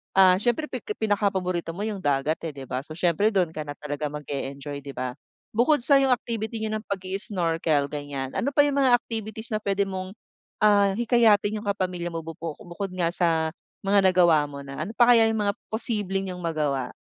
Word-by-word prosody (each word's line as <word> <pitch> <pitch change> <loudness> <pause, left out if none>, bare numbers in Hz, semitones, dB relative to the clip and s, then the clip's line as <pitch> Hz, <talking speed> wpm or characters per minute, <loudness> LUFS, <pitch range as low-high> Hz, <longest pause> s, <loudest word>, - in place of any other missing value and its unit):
Ah, 185 -1 +6
siyempre 240 +7 +1
pik 260 - -5
pinakapaborito 190 -5 -1
mo 205 - -4
yung 210 -3 -3
dagat, 145 0 0
eh, 150 - -7
di 135 - -7
ba? 130 0 -3
So, 155 +3 -9
siyempre 175 +4 +2
dun 175 -4 +2
ka 155 -2 -6
na 145 - -5
talaga 150 0 -4
mag-e-enjoy, 140 -1 -5
'di 140 -1 -9
ba? 125 -1 -3 0.4
Bukod 245 +4 +3
sa 275 0 +6
yung 270 -1 +2
activity 225 -1 -4
niyo 215 - -2
ng 215 - -16
pag 195 -2 -3
i-snorkel 165 -6 -1
gan'yan, 145 -3 -4
ano 270 - -2
pa 290 - +7
yung 280 -1 +1
mga 255 -3 +6
activities 220 -2 -5
na 215 - 0
pwede 200 -1 0
mong, 190 +1 -5 0.5
ah, 200 -2 +5
hikayatin 220 -3 +3
yung 205 - -9
kapamilya 185 -3 -1
mo 165 -1 -5
bu 165 - -6
bu 165 -2 -4
bukod 185 +3 -5
nga 170 -2 +1
sa 165 -3 +1 0.3
mga 195 -1 +4
nagawa 170 -5 +4
mo 140 -1 -8
na, 135 0 -8
ano 220 - -8
pa 245 0 +6
kaya 225 -2 +6
yung 220 -1 0
mga 200 0 +1
posibleng 195 -4 -2
niyong 180 - -7
magawa? 150 -6 -1
185 Hz, 205 wpm, -25 LUFS, 155-215 Hz, 0.5 s, pa